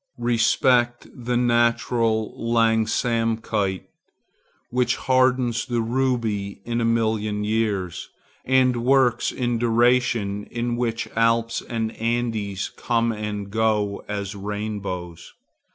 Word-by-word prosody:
Respect 120 Hz, +1 st, +2 dB
the 125 Hz, -1 st, -3 dB
naturlangsamkeit 115 Hz, -3 st, +1 dB, 0.9 s
which 125 Hz, 0 st, +1 dB
hardens 130 Hz, -3 st, +1 dB
the 120 Hz, -2 st, 0 dB
ruby 115 Hz, -5 st, -1 dB
in 120 Hz, 0 st, -1 dB
a -, -, +1 dB
million 110 Hz, -2 st, 0 dB
years, 105 Hz, -5 st, -1 dB, 0.3 s
and 130 Hz, -2 st, +2 dB
works 130 Hz, -2 st, +3 dB
in 120 Hz, -2 st, -1 dB
duration 115 Hz, -3 st, +2 dB
in 120 Hz, 0 st, -3 dB
which 115 Hz, -2 st, -2 dB
Alps 115 Hz, 0 st, +2 dB
and 115 Hz, -2 st, -3 dB
Andes 115 Hz, -4 st, -2 dB
come 115 Hz, -1 st, 0 dB
and 105 Hz, -2 st, -5 dB
go 105 Hz, -2 st, 0 dB
as 100 Hz, -1 st, -4 dB
rainbows. 100 Hz, -4 st, -5 dB
115 Hz, 95 wpm, -23 LUFS, 105-120 Hz, 0.9 s, works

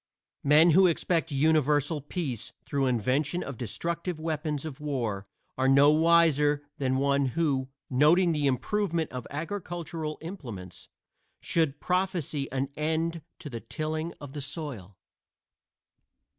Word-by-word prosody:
Men 150 Hz, +4 st, +6 dB
who 185 Hz, +4 st, +6 dB
expect 165 Hz, -1 st, 0 dB
universal 150 Hz, 0 st, +2 dB
peace 140 Hz, -, -4 dB
through 140 Hz, -2 st, 0 dB
invention 135 Hz, -, 0 dB
of 140 Hz, -, -6 dB
destructive 170 Hz, -, -3 dB
weapons 155 Hz, -2 st, -2 dB
of 150 Hz, -2 st, -7 dB
war 120 Hz, -10 st, -3 dB, 0.3 s
are 130 Hz, -, +3 dB
no 140 Hz, +2 st, +6 dB
wiser 155 Hz, -3 st, +4 dB, 0.2 s
than 130 Hz, -1 st, +1 dB
one 140 Hz, 0 st, +2 dB
who, 135 Hz, -5 st, +1 dB, 0.2 s
noting 160 Hz, +7 st, +4 dB
the 150 Hz, -3 st, +1 dB
improvement 165 Hz, +4 st, 0 dB
of 125 Hz, -2 st, -6 dB
agricultural 165 Hz, -1 st, -4 dB
implements, 120 Hz, -, -8 dB, 0.5 s
should 155 Hz, -4 st, 0 dB
prophesy 180 Hz, -6 st, -1 dB
an 135 Hz, +1 st, -1 dB
end 160 Hz, +2 st, -1 dB, 0.2 s
to -, -, -9 dB
the 120 Hz, -5 st, -5 dB
tilling 155 Hz, +4 st, -3 dB
of 145 Hz, -2 st, -9 dB
the 145 Hz, -, -5 dB
soil. 130 Hz, -, -5 dB
150 Hz, 125 wpm, -28 LUFS, 135-165 Hz, 0.5 s, Men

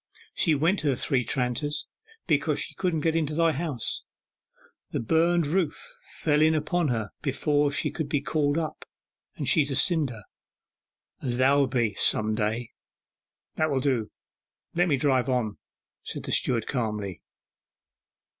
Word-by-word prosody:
'She 160 Hz, -3 st, +3 dB
went 165 Hz, +8 st, +2 dB
to 150 Hz, -, -1 dB
the 135 Hz, -, +2 dB
Three 125 Hz, 0 st, 0 dB
Tranters, 135 Hz, +5 st, -1 dB, 0.4 s
because -, -, +1 dB
she -, -, -4 dB
couldn't 175 Hz, -4 st, -1 dB
get 160 Hz, +1 st, +1 dB
into 155 Hz, -2 st, 0 dB
thy 165 Hz, 0 st, +3 dB
house, 150 Hz, -6 st, -3 dB, 0.9 s
the -, -, -2 dB
burnen 165 Hz, +7 st, +2 dB
roof 170 Hz, -4 st, -2 dB, 0.2 s
fell 150 Hz, -1 st, +2 dB
in 160 Hz, +1 st, +4 dB
upon 155 Hz, +2 st, 0 dB
her 110 Hz, -5 st, -2 dB
before 145 Hz, +1 st, +1 dB
she 140 Hz, -, -1 dB
could 155 Hz, -4 st, -4 dB
be 145 Hz, -, +1 dB
called 145 Hz, 0 st, 0 dB
up, 160 Hz, -2 st, -3 dB, 0.5 s
and -, -, -4 dB
she's 150 Hz, -3 st, +4 dB
a 135 Hz, -, -1 dB
cinder, 140 Hz, -, +1 dB, 1.0 s
as 120 Hz, -3 st, -1 dB
thou'lt 135 Hz, +1 st, +4 dB
be 120 Hz, -4 st, +1 dB
some 110 Hz, +2 st, +3 dB
day.' 110 Hz, +2 st, -2 dB, 0.9 s
'That 155 Hz, 0 st, +2 dB
will 135 Hz, -2 st, +1 dB
do, 125 Hz, -6 st, 0 dB, 0.6 s
let 175 Hz, +1 st, +2 dB
me 145 Hz, -5 st, +2 dB
drive 130 Hz, -1 st, +2 dB
on,' 120 Hz, -5 st, -1 dB, 0.4 s
said -, -, -5 dB
the -, -, -5 dB
steward 115 Hz, -3 st, +2 dB
calmly. 105 Hz, -, -3 dB
145 Hz, 150 wpm, -26 LUFS, 125-155 Hz, 1.0 s, in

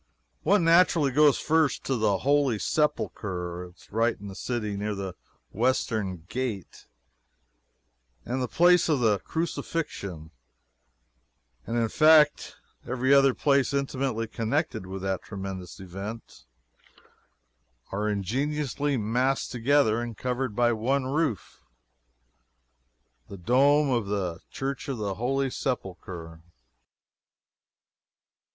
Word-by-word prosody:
One 195 Hz, +2 st, +3 dB
naturally 165 Hz, -4 st, +4 dB
goes 145 Hz, +1 st, +5 dB
first 160 Hz, -3 st, +1 dB
to 135 Hz, -, -1 dB
the 110 Hz, -4 st, +2 dB
Holy 140 Hz, -5 st, +3 dB
Sepulchre. 90 Hz, -, -2 dB
It 90 Hz, 0 st, -15 dB
is -, -, -21 dB
right 115 Hz, +1 st, +1 dB
in 100 Hz, 0 st, -8 dB
the -, -, -8 dB
city, 105 Hz, -3 st, -3 dB
near 105 Hz, +1 st, -3 dB
the 95 Hz, -2 st, -5 dB, 0.4 s
western 105 Hz, -7 st, -1 dB
gate; 120 Hz, -7 st, -5 dB, 1.4 s
it -, -, -7 dB
and 130 Hz, +1 st, -1 dB
the 125 Hz, -, -1 dB
place 175 Hz, +7 st, +4 dB
of 150 Hz, -4 st, +2 dB
the 110 Hz, -4 st, +2 dB
Crucifixion, 120 Hz, -, -4 dB, 1.4 s
and, 115 Hz, -, -1 dB
in 115 Hz, -1 st, +2 dB
fact, 155 Hz, +3 st, +4 dB, 0.3 s
every 130 Hz, +2 st, +1 dB
other 135 Hz, -2 st, +5 dB
place 140 Hz, -1 st, +2 dB
intimately 130 Hz, -4 st, -1 dB
connected 115 Hz, -, -2 dB
with 95 Hz, 0 st, -6 dB
that 95 Hz, -1 st, -1 dB
tremendous 95 Hz, -3 st, -7 dB
event, 95 Hz, -, -8 dB, 1.4 s
are 105 Hz, +2 st, -1 dB
ingeniously 140 Hz, +7 st, -1 dB
massed 125 Hz, +5 st, 0 dB
together 125 Hz, -2 st, +2 dB
and 120 Hz, -3 st, -6 dB
covered 125 Hz, -3 st, -2 dB
by 120 Hz, 0 st, +3 dB
one 130 Hz, +5 st, 0 dB
roof 140 Hz, -, -2 dB, 1.7 s
the 100 Hz, -, -8 dB
dome 140 Hz, -, +3 dB
of 120 Hz, -5 st, 0 dB
the 95 Hz, -5 st, -2 dB
Church 135 Hz, +2 st, -4 dB
of 135 Hz, -, -2 dB
the 100 Hz, -2 st, -2 dB
Holy 135 Hz, +5 st, -1 dB
Sepulchre. 90 Hz, -, -5 dB
120 Hz, 115 wpm, -27 LUFS, 100-140 Hz, 1.7 s, goes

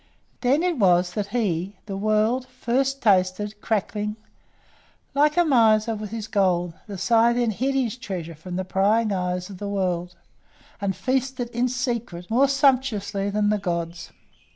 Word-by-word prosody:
Then 275 Hz, +6 st, +2 dB
it 350 Hz, -6 st, 0 dB
was 180 Hz, -2 st, +3 dB
that 205 Hz, 0 st, -2 dB
he 200 Hz, -4 st, -1 dB
the 200 Hz, -2 st, -5 dB
world 215 Hz, +5 st, +1 dB
first 260 Hz, +2 st, -1 dB
tasted 205 Hz, +1 st, +1 dB
crackling. 210 Hz, -1 st, -1 dB, 1.0 s
Like 300 Hz, +3 st, +3 dB
a 350 Hz, -, +5 dB
miser 225 Hz, -5 st, +4 dB
with 215 Hz, -1 st, -5 dB
his 220 Hz, 0 st, -5 dB
gold, 180 Hz, -4 st, +1 dB
the 200 Hz, -2 st, -6 dB
Scythian 235 Hz, +3 st, +3 dB
hid 265 Hz, +6 st, -1 dB
his 250 Hz, -3 st, 0 dB
treasure 180 Hz, -8 st, -5 dB
from 175 Hz, +4 st, -8 dB
the 185 Hz, 0 st, -2 dB
prying 210 Hz, +4 st, +2 dB
eyes 180 Hz, 0 st, -2 dB
of 185 Hz, -, -10 dB
the 205 Hz, -, -4 dB
world, 180 Hz, -3 st, -2 dB, 0.7 s
and 195 Hz, -2 st, -1 dB
feasted, 260 Hz, -1 st, -1 dB
in 240 Hz, +1 st, 0 dB
secret, 235 Hz, -7 st, -3 dB
more 265 Hz, +5 st, +4 dB
sumptuously 250 Hz, -8 st, +1 dB
than 205 Hz, 0 st, +1 dB
the 210 Hz, -, +1 dB
gods. 170 Hz, -2 st, -3 dB
210 Hz, 155 wpm, -24 LUFS, 190-245 Hz, 1.0 s, a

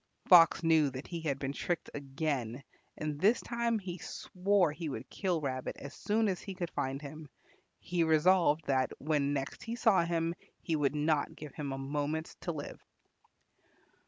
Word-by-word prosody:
Fox 170 Hz, -2 st, +7 dB
knew 160 Hz, -3 st, +4 dB
that 130 Hz, +2 st, -7 dB
he 170 Hz, -2 st, -5 dB
had 145 Hz, -4 st, -1 dB
been 135 Hz, 0 st, -3 dB
tricked 175 Hz, +3 st, -3 dB
again, 135 Hz, -3 st, -3 dB, 0.3 s
and 150 Hz, -1 st, -3 dB
this 220 Hz, +5 st, +5 dB
time 235 Hz, -1 st, 0 dB
he 185 Hz, -3 st, -6 dB
swore 185 Hz, 0 st, +1 dB
he 155 Hz, +1 st, -5 dB
would 130 Hz, -2 st, -6 dB
kill 180 Hz, -4 st, 0 dB
Rabbit 130 Hz, -3 st, -3 dB
as 140 Hz, 0 st, -8 dB
soon 220 Hz, +1 st, +1 dB
as 185 Hz, -3 st, -1 dB
he 195 Hz, -, -7 dB
could 175 Hz, -2 st, -4 dB
find 135 Hz, +1 st, -2 dB
him; 150 Hz, +1 st, -9 dB, 0.5 s
he 175 Hz, -1 st, 0 dB
resolved 160 Hz, -1 st, +4 dB
that 130 Hz, -2 st, +1 dB
when 145 Hz, -1 st, 0 dB
next 135 Hz, -1 st, -3 dB
he 230 Hz, +1 st, -4 dB
saw 220 Hz, -6 st, +4 dB
him 170 Hz, 0 st, 0 dB, 0.3 s
he 165 Hz, -, -1 dB
would 145 Hz, -1 st, +1 dB
not 150 Hz, 0 st, +1 dB
give 150 Hz, -2 st, -9 dB
him 145 Hz, -3 st, -4 dB
a 135 Hz, -, -3 dB
moment 145 Hz, +3 st, -3 dB
to 175 Hz, -, -2 dB
live. 145 Hz, -3 st, -7 dB
155 Hz, 175 wpm, -32 LUFS, 140-175 Hz, 0.5 s, Fox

